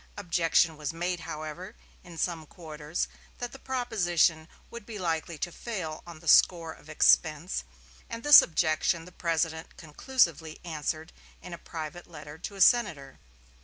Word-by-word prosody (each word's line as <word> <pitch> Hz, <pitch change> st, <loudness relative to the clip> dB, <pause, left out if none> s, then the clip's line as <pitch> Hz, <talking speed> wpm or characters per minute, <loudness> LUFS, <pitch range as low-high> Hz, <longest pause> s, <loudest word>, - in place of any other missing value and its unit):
Objection 165 Hz, -3 st, +2 dB
was 150 Hz, 0 st, -3 dB
made, 175 Hz, +2 st, -3 dB
however, 160 Hz, +5 st, -7 dB, 0.3 s
in 170 Hz, -2 st, -12 dB
some 160 Hz, -1 st, -2 dB
quarters 155 Hz, -2 st, -5 dB, 0.3 s
that 245 Hz, -1 st, -5 dB
the 270 Hz, -, -11 dB
proposition 180 Hz, -12 st, +1 dB, 0.2 s
would 235 Hz, -2 st, -8 dB
be 215 Hz, 0 st, -8 dB
likely 165 Hz, -2 st, -2 dB
to 175 Hz, -, -4 dB
fail 180 Hz, -8 st, -5 dB
on 170 Hz, -2 st, -10 dB
the 165 Hz, -, -13 dB
score 165 Hz, 0 st, +5 dB
of 155 Hz, -, -18 dB
expense, 155 Hz, +2 st, +3 dB, 0.5 s
and 230 Hz, 0 st, -6 dB
this 295 Hz, -1 st, +10 dB
objection 165 Hz, 0 st, 0 dB
the 180 Hz, -, -13 dB
President 165 Hz, -2 st, -2 dB
conclusively 160 Hz, -, 0 dB
answered 160 Hz, 0 st, -4 dB, 0.3 s
in 180 Hz, -, -10 dB
a -, -, -6 dB
private 165 Hz, +1 st, -7 dB
letter 150 Hz, -2 st, -11 dB
to 200 Hz, -, -7 dB
a 195 Hz, -, -5 dB
senator. 165 Hz, -, +3 dB
165 Hz, 150 wpm, -28 LUFS, 155-180 Hz, 0.5 s, this